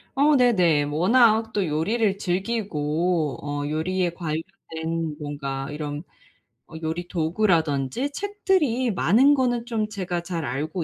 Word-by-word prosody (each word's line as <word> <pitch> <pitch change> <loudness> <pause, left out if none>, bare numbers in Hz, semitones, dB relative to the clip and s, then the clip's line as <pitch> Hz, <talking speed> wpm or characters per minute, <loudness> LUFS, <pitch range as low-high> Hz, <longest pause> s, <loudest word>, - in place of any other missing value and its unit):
어 290 +2 +4
네네. 180 - +4
뭐 145 +2 -3
워낙 225 +1 +4
또 200 -2 +1
요리를 195 +7 0
즐기고 175 - -1
어 145 0 -3
요리에 175 +4 0
관련된 165 -1 -4
뭔가 140 -2 -4
이런 150 0 -5 0.6
어 - - -13
요리 165 +2 -3
도구라든지 165 - 0
책들이 325 - 0
많은 225 - +4
거는 245 -4 0
좀 225 -3 -1
제가 180 -4 -3
잘 170 -2 -4
알고 155 +7 -3
175 Hz, 250 characters per minute, -24 LUFS, 155-225 Hz, 0.6 s, 어